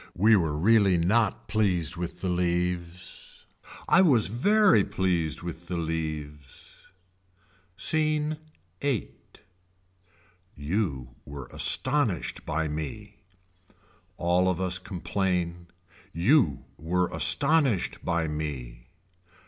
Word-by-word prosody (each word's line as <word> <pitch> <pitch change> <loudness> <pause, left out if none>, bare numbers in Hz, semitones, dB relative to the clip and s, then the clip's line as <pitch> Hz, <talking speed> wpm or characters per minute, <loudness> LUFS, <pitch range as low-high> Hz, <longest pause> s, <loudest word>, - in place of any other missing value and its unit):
We 110 +5 +5
were 80 -6 0
really 100 +1 +4
not 100 +5 +1
pleased 95 -6 0
with 85 0 -6
the 95 - -2
leaves. 90 0 -3 0.4
I 185 - +5
was 125 - +4
very 185 - +4
pleased 85 -5 -1
with 85 0 -7
the 90 - -3
leaves. 75 -4 -6 0.9
Scene 155 +3 +1 0.4
VIII. 135 -9 -1 1.4
You 75 - -2
were 70 -2 -9
astonished 125 - +1
by 80 +1 -1
me. 90 +8 -6 1.0
All 90 +2 +2
of 90 -2 -1
us 90 -1 0
complain. 90 -2 -3 0.4
You 90 - +2
were 90 +3 -1
astonished 140 - +1
by 85 -1 0
me. 65 -6 -6
90 Hz, 95 wpm, -27 LUFS, 80-105 Hz, 1.4 s, We